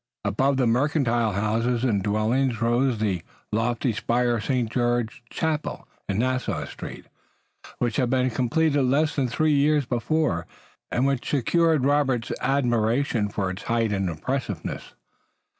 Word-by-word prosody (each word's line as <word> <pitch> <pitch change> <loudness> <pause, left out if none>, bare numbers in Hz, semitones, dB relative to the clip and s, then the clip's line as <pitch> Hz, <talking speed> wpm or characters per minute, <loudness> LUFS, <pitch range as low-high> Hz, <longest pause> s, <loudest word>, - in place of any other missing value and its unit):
Above 135 +5 +1
the 130 - +2
mercantile 120 -3 +1
houses 115 +4 0
and 110 -6 +2
dwellings 110 +5 +1
rose 120 +1 +2
the 100 -5 -1 0.3
lofty 115 +2 0
spire 120 +2 +1
of 110 - -5
St. 125 -4 0
George's 120 0 -1
Chapel 160 -1 -2 0.2
in 100 - 0
Nassau 130 +2 -1
Street, - - -9 0.7
which 120 -3 -1
had 125 - +1
been 130 0 +1
completed 145 +5 +1
less 140 +4 +2
than 135 -3 +1
three 155 +6 +1
years 145 0 +3
before, 120 - 0 0.4
and 125 - +1
which 135 -2 -1
secured 155 +1 +2
Robert's 135 -5 +1
admiration 120 -3 +1
for 100 -2 -2
its 95 - -7
height 115 -2 +1
and 95 -2 0
impressiveness. 105 - -4
120 Hz, 140 wpm, -25 LUFS, 110-135 Hz, 0.7 s, years